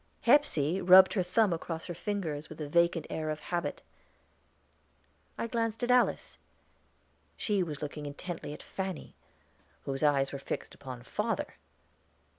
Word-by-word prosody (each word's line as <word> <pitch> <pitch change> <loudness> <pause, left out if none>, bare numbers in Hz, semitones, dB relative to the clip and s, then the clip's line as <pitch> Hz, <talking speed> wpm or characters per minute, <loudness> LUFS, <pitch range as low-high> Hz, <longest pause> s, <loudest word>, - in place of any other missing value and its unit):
Hepsey 190 - +3
rubbed 185 +1 +8
her 195 - +2
thumb 185 +2 +2
across 165 0 -4
her 175 - -5
fingers 170 -5 -3
with 155 - -9
the 150 - -4
vacant 170 +2 +2
air 155 -1 -2
of 155 0 -2
habit. 175 +2 -3 1.5
I - - -2
glanced 230 -1 -2
at 245 - +2
Alice; 250 -1 +2 1.0
she 205 -3 +1
was 155 -4 -3
looking 150 0 -5
intently 165 +2 -6
at 150 - -9
Fanny, 190 -4 -5 0.7
whose 135 -1 -3
eyes 140 -2 +3
were 140 - -5
fixed - - -5
upon 130 -3 -9
father. - - -2
170 Hz, 140 wpm, -31 LUFS, 150-195 Hz, 1.5 s, rubbed